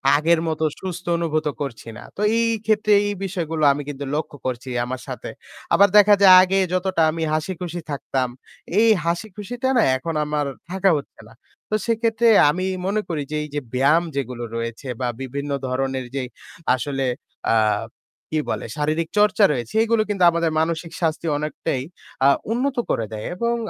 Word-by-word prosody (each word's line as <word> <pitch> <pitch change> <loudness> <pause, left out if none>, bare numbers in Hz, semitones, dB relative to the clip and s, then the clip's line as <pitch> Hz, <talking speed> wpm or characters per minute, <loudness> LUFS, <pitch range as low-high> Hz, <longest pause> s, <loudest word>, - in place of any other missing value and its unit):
আগের 160 +2 +3
মতো 160 0 -1 0.2
সুস্থ 180 -1 -6
অনুভূত 155 -2 -1
করছি 120 -5 -5
না। - - -10
তো - - -4 0.2
এই 230 0 +2 0.2
ক্ষেত্রে 215 -1 +2 0.2
এই 205 - -1
বিষয়গুলো 165 -5 -3
আমি 145 - -4
কিন্তু 140 0 -5
লক্ষ্য 150 -1 -4
করছি 125 +1 -4 0.2
আমার 130 0 -5
সাথে। - - -6 0.4
আবার 200 +1 +7
দেখা 205 0 +7
যায় 190 -2 +9
আগে 190 +1 +2 0.2
যতটা 185 -2 0
আমি 165 0 -3
হাসিখুশি 175 +1 -3
থাকতাম, 135 -2 -1 0.5
এই 230 - +5 0.2
হাসিখুশিটা 215 +8 -3
না - - +5 0.2
এখন 165 +5 -4
আমার 150 -1 -1 0.3
থাকা 190 0 +2
হচ্ছে 140 - -9
না। - - -16 0.4
তো 215 - +1
সেক্ষেত্রে 230 0 +1 0.2
আমি 185 +4 -1 0.2
মনে 210 +2 0
করি 155 -3 -2
যে, - - -2
এই 150 - -8
যে - - +1
ব্যায়াম 145 +6 +3
যেগুলো 125 -3 -3
রয়েছে 115 +3 -5
বা 125 - 0
বিভিন্ন 140 +2 -4 0.2
ধরনের 130 0 -2
যে 135 - -1 0.5
আসলে, 135 +1 -2 0.5
আ - - +4 0.8
কী 155 - +1
বলে, - - -2
শারীরিক 155 +2 -1
চর্চা 210 0 +4
রয়েছে 120 -4 -3
সেগুলো 230 -1 +2
কিন্তু 195 -3 0
আমাদের 165 -1 0
মানসিক 165 +1 -1
স্বাস্থ্য 165 0 -1
অনেকটাই, 150 -3 -3 0.4
আ - - +7 0.2
উন্নত 255 +2 -1
করে 115 - 0
দেয় 105 0 -5
এবং, 235 +3 0
165 Hz, 165 wpm, -22 LUFS, 140-195 Hz, 0.8 s, যায়